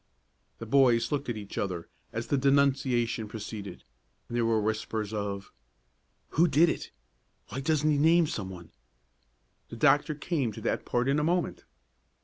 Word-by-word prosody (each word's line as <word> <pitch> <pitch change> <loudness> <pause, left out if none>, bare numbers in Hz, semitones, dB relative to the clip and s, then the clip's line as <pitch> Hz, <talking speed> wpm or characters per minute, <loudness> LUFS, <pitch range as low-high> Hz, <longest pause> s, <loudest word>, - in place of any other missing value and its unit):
The 115 - -7
boys 120 -1 +3
looked 145 -3 -2
at 120 - -2
each 100 -2 -6
other 90 -4 -3 0.2
as 115 +1 -3
the 135 - 0
denunciation 135 -4 +2
proceeded, 105 -3 -7 0.4
and 120 - -6
there 120 -1 +2
were 115 -1 +2
whispers 110 0 -2
of: 100 -2 -4 0.8
"Who 170 +3 +3
did 160 +3 +4
it? - - -4 0.6
Why 125 - -4
doesn't 155 +1 +1
he 145 - +2
name 165 +3 +5
some 100 -10 -4
one?" 85 -3 -10 1.0
The - - -8
doctor 150 +1 +3
came 145 -5 -1
to - - -8
that - - -1
part 120 +1 0
in 140 +2 +2
a - - 0
moment. 175 +2 -1
120 Hz, 160 wpm, -29 LUFS, 110-145 Hz, 1.0 s, name